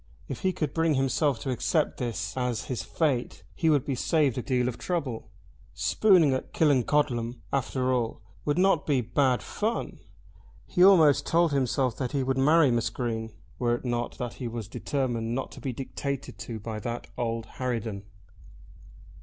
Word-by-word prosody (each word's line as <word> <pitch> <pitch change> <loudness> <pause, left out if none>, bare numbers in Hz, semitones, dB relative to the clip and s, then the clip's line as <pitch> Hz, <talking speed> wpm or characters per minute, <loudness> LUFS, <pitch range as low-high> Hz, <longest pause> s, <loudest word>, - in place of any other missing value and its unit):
If - - -5
he 190 -2 +1
could 155 -6 -3
bring 165 -2 +2
himself 135 +1 +1
to 135 - -2
accept 150 +5 0
this 115 -4 -3
as 125 -3 -1
his 125 - -3
fate 140 -7 -1
he 165 - +1
would 145 -4 +3
be 140 - -1
saved 140 0 +2
a 125 - -2
deal 125 -1 0
of 125 -1 -4
trouble. 140 -12 -3 0.5
Spooning 150 - +4
at 130 - -4
Killancodlem, 130 -4 +2
after 130 -1 0
all, 115 -3 -2 0.2
would 145 +1 0
not 185 -4 +3
be 140 -4 +3
bad 125 +2 +1
fun. 225 +2 -3 0.7
He 180 - +2
almost 165 -7 +6
told 170 -1 +3
himself 130 -2 +1
that 130 0 -3
he 140 -2 +1
would 135 0 0
marry 150 0 +5
Miss 115 -1 +1
Green, 110 -2 -3 0.3
were 120 -1 +2
it 120 - -8
not 120 -1 -2
that 120 -1 -4
he 125 - -2
was 115 -3 -5
determined 120 -2 -2
not 135 - -3
to - - -11
be 135 - -2
dictated 135 -2 -5
to 110 +4 -6
by 110 +1 -5
that 120 +3 -4
old 115 -1 -2
harridan. 115 -5 -2
130 Hz, 170 wpm, -27 LUFS, 120-145 Hz, 0.7 s, almost